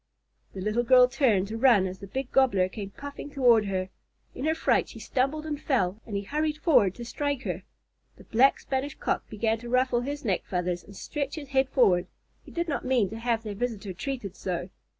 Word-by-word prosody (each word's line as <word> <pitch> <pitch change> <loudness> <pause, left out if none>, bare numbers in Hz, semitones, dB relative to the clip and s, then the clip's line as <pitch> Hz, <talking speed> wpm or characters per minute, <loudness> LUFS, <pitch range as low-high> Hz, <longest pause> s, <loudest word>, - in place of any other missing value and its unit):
The 190 - -6
little 215 +4 +1
girl 250 +1 +6
turned 240 -7 +2
to 225 +1 -4
run 230 -7 +5
as 185 0 -5
the 200 - -9
big 265 +5 -4
Gobbler 220 -9 +4
came 200 0 -6
puffing 285 +6 -8
toward 245 -6 +4
her. 190 -1 -2 0.4
In 265 - -5
her 315 +1 +2
fright - - +2
she - - -11
stumbled 275 +4 -1
and 300 -1 -4
fell, 210 -6 0
and 210 - -5
he 200 - -1
hurried 300 +7 -1
forward 250 - +3
to 240 - -7
strike 285 +2 -2
her. 180 -4 -3 0.6
The - - -14
Black 255 +5 +4
Spanish 270 +1 -3
Cock - - -2
began 220 +1 0
to 240 +1 -8
ruffle 255 -1 +2
his 285 +2 -5
neck 195 -5 0
feathers 180 -1 -2
and 200 - -14
stretch 285 +6 -4
his 290 -4 -8
head 265 -1 +2
forward. 185 -10 +3 0.4
He - - -14
did 340 0 -2
not 290 - -2
mean 250 -7 +1
to 225 - -6
have 230 -1 0
their 210 -2 -4
visitor 210 -3 -3
treated 210 -2 -5
so. 180 0 -4
240 Hz, 210 wpm, -27 LUFS, 200-270 Hz, 0.6 s, girl